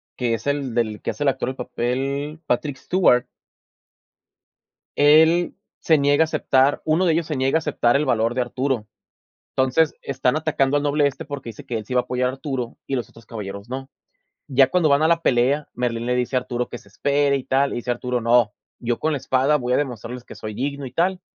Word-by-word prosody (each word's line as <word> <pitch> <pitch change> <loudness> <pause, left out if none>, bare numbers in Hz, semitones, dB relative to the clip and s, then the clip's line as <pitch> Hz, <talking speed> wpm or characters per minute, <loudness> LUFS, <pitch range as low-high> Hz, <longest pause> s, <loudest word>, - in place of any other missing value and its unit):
que 120 -2 0
es 130 - -8
el 140 -4 -1
del 110 -4 -1
que - - -2
hace 145 - -4
el 140 - +4
actor 130 -1 -2
del 130 - -5
papel, 135 +5 -3
Patrick 135 +2 -1
Stewart. 130 -5 +3 1.7
Él 160 +4 +5 0.2
se 160 -2 +3
niega 145 +2 +4
a - - +1
aceptar 145 -3 +2
uno 160 +4 +2
de 165 - +3
ellos 165 0 0
se 155 - -2
niega 135 +4 +2
a - - +1
aceptar 135 -5 +1
el 150 +2 +2
valor 115 -1 +1
de 125 - 0
Arturo. 125 -2 -2 0.7
Entonces, 130 +4 +2
están 135 +1 0
atacando 145 -3 +1
al 145 - -1
noble 145 0 +3
este 140 - -6
porque 140 -5 -6
dice 110 - -10
que 120 - -3
él 110 - -6
sí 125 - -5
va 125 - +4
a - - -15
apoyar 125 0 0
a 130 - -4
Arturo 135 -4 -4
y 135 - -2
los 120 -4 -3
otros 115 - -17
caballeros 100 0 -7
no. 135 +1 -5 0.6
Ya 135 -1 +4
cuando 175 -1 +2
van 140 +1 +4
a 160 - +4
la 170 0 +3
pelea, 135 +4 +2
Merlín 120 -1 -2
le 125 - +1
dice 125 +1 -1
a - - +3
Arturo 125 -1 -3
que 120 - -7
se 100 - -19
espere 140 +6 +1
y 130 - -5
tal, 135 +1 +2
le - - -4
dice 120 +1 -3
Arturo: 125 0 -1
"No, 115 -2 +3 0.3
yo 120 0 -2
con 160 - 0
la 145 - -1
espada 135 +4 +2
voy 125 -2 -2
a - - +4
demostrarles 125 -2 -4
que - - -11
soy 110 -1 -7
digno 140 +3 -3
y 125 - -9
tal". 180 +5 +1
130 Hz, 230 wpm, -22 LUFS, 120-145 Hz, 1.7 s, Él